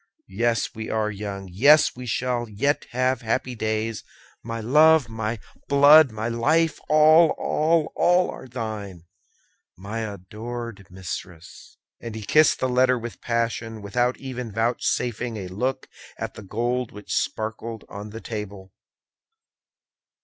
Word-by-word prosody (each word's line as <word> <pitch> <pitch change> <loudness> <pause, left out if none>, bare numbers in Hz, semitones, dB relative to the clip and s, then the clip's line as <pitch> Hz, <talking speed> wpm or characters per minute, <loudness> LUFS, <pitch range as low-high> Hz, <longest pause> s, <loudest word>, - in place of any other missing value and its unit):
Yes, 115 +3 0
we 110 0 -6
are 110 -1 0
young; 100 -1 -6
yes, 145 - +5
we 125 0 -8
shall 120 0 -1
yet 140 +8 -1
have 130 0 0
happy 125 +2 -1
days! 110 -1 -2 0.4
My 115 0 -5
love, 150 +4 +5
my 110 0 -3 0.3
blood, 145 0 +7
my 110 +1 -4
life! 150 +7 +1
all, 155 +2 +6
all, 160 0 +1
all, 180 +1 +3
are 130 - -10
thine, 110 -7 -6 0.7
my 100 +5 -5
adored 110 +1 -7
mistress!" 90 -2 -9 0.2
And 115 -2 -7
he 110 - -6
kissed 155 +8 +4
the 130 - +1
letter 130 0 +3
with 120 -1 -8
passion, 115 -2 -2
without 120 +5 0
even 125 -4 -6
vouchsafing 115 +1 -1
a 95 -3 -5
look 125 +8 -2 0.3
at - - -5
the - - -10
gold 120 +4 -2
which 105 0 -7
sparkled 110 0 -3
on 100 +1 -8
the 110 +2 -9
table. 100 -3 -7
115 Hz, 135 wpm, -24 LUFS, 105-130 Hz, 0.7 s, blood